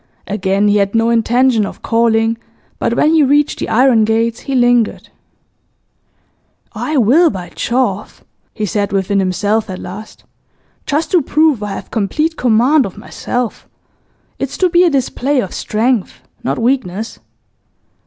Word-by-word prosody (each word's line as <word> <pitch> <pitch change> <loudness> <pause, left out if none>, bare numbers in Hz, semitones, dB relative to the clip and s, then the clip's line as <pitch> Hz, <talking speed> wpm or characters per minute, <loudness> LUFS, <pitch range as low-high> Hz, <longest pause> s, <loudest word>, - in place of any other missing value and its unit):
Again 200 0 0
he 205 0 +3
had 200 +1 0
no 230 +1 +2
intention 235 0 +2
of 200 - -7
calling, 225 0 +1 0.4
but 235 - 0
when 310 +5 +3
he 320 - +4
reached 290 +1 +2
the - - -3
iron 245 -1 +4
gates 225 +2 0
he 275 - -4
lingered. 245 -2 +1 1.6
'I 305 -1 -2
will, 275 +9 +4
by 180 -3 -7
Jove!' 235 -5 -2 0.3
he 215 - -4
said 205 +1 -2
within 195 0 0
himself 205 +4 0
at 185 - -5
last. 205 +5 -10 0.6
'Just 300 +3 -1
to 355 - +4
prove 300 -4 +2
I 205 -1 -4
have - - -8
complete 305 +10 -1
command 250 +3 +3
of 190 - -12
myself. 245 -2 -5 0.7
It's - - -4
to 370 - +2
be 350 +1 +5
a 355 - +4
display 275 0 0
of 195 -7 -3
strength, 225 -1 -1 0.2
not - - -1
weakness. 230 -4 -2
230 Hz, 145 wpm, -15 LUFS, 210-265 Hz, 1.6 s, be